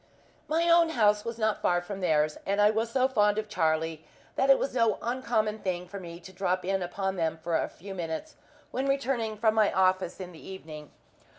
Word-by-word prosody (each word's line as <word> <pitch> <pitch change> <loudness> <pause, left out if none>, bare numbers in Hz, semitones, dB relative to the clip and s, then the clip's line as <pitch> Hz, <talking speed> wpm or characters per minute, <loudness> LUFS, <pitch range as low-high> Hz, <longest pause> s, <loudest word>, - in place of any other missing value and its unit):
My 330 +2 +1
own 335 -1 +5
house 210 -8 +3
was 230 0 -5
not 220 -2 0
far 175 0 +2
from 190 +2 -7
theirs, 155 -3 +2
and 200 +1 -1
I 205 +1 +6
was 225 +1 -1
so 255 +2 +2
fond 210 -5 +2
of 215 0 -2
Charlie 160 -4 0 0.3
that 270 - +1
it 270 - +8
was 275 - -2
no 230 -3 +2
uncommon 230 -3 -1
thing 180 -2 -3
for 200 +2 -7
me 170 -2 -9
to 190 +2 -12
drop 185 -1 -1
in 195 0 0
upon 190 +2 -3
them 165 -1 -1
for 170 -1 -1
a - - 0
few 195 +3 -10
minutes, 175 - -5 0.4
when 265 +2 -1
returning 260 -5 -1
from 220 0 +3
my 215 -2 +3
office 185 -1 +1
in 180 -1 -7
the 165 - -13
evening. 155 -6 -9
200 Hz, 210 wpm, -28 LUFS, 175-230 Hz, 0.4 s, it